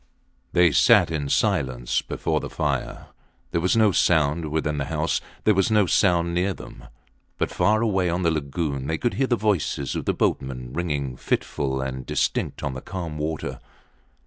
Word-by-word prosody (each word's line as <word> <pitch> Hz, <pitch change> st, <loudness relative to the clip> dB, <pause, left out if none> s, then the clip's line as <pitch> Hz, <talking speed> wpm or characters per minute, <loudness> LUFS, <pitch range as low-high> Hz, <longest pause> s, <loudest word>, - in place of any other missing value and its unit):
They 85 Hz, -2 st, +5 dB
sat 75 Hz, -, +5 dB
in 75 Hz, -3 st, -2 dB
silence 60 Hz, -3 st, +1 dB
before -, -, -2 dB
the -, -, -6 dB
fire. -, -, -3 dB, 0.4 s
There 85 Hz, -, 0 dB
was 90 Hz, +6 st, +2 dB
no 110 Hz, -2 st, +5 dB
sound 80 Hz, -2 st, +2 dB
within 75 Hz, -1 st, -1 dB
the 70 Hz, -, -1 dB
house, 75 Hz, +2 st, -1 dB, 0.2 s
there 110 Hz, -, +4 dB
was 95 Hz, +2 st, +2 dB
no 105 Hz, -2 st, +4 dB
sound 85 Hz, -2 st, +2 dB
near 90 Hz, +2 st, 0 dB
them; -, -, -12 dB, 0.5 s
but -, -, -1 dB
far 110 Hz, +2 st, +2 dB
away 95 Hz, -5 st, +1 dB
on 90 Hz, +2 st, -1 dB
the 85 Hz, -, +3 dB
lagoon 70 Hz, -2 st, -2 dB
they 80 Hz, +1 st, -1 dB
could 120 Hz, -, -1 dB
hear 135 Hz, -, 0 dB
the 120 Hz, -, +2 dB
voices 95 Hz, -, -1 dB
of -, -, -3 dB
the -, -, +1 dB
boatmen 65 Hz, -2 st, -2 dB
ringing 70 Hz, -6 st, -2 dB
fitful 65 Hz, 0 st, -1 dB
and 65 Hz, -1 st, -4 dB
distinct -, -, -1 dB
on 70 Hz, -, -2 dB
the 65 Hz, -, -6 dB
calm 85 Hz, -4 st, -6 dB
water. 75 Hz, 0 st, -3 dB
80 Hz, 175 wpm, -24 LUFS, 70-90 Hz, 0.5 s, They